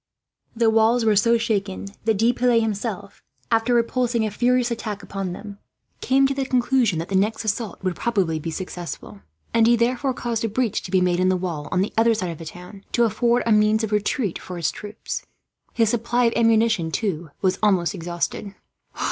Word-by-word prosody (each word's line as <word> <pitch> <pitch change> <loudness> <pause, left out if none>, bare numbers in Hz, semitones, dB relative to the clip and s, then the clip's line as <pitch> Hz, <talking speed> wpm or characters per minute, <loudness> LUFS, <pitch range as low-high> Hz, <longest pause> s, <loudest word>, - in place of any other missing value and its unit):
The 230 -1 +3
walls 225 +2 +3
were 215 -1 +4
so 230 +3 +4
shaken 200 -4 -2 0.2
that 220 -2 +2
De 230 +4 +3
Piles 245 -1 +3
himself, 210 -2 -4 0.3
after 225 +2 +2
repulsing 235 -1 +1
a 215 - -2
furious 245 +2 +1
attack 215 -3 -4
upon 195 -2 -4
them, 200 +2 -9 0.4
came 270 +1 +3
to 275 - +1
the 275 0 -1
conclusion 250 -6 +2
that 165 +2 -4
the 195 - -1
next 215 +4 +1
assault 215 -1 -3
would 185 -2 -1
probably 190 -9 0
be 165 - -5
successful; 170 - -7 0.3
and 225 -1 +4
he 240 - +5
therefore 250 +3 0
caused 230 -2 -2
a 225 - 0
breach 230 0 -1
to - - -8
be 185 0 +2
made 180 -1 +2
in 185 0 +3
the 185 - +2
wall 165 -5 -4
on 180 - +2
the 200 - -2
other 225 0 +4
side 185 -5 -2
of 165 - -9
the 165 - -8
town, 180 +4 -10
to 240 - +3
afford 235 +2 +2
a 230 - +1
means 215 +1 +4
of 220 - -2
retreat 210 - 0
for 180 - -8
his 165 -4 0
troops. 210 - -6 0.5
His 225 -2 +2
supply 240 +1 +1
of 230 - +2
ammunition, 225 -6 +3
too, 175 -3 -2
was 190 0 +1
almost 190 -6 +2
exhausted. 175 +4 -4
215 Hz, 200 wpm, -23 LUFS, 185-235 Hz, 0.5 s, he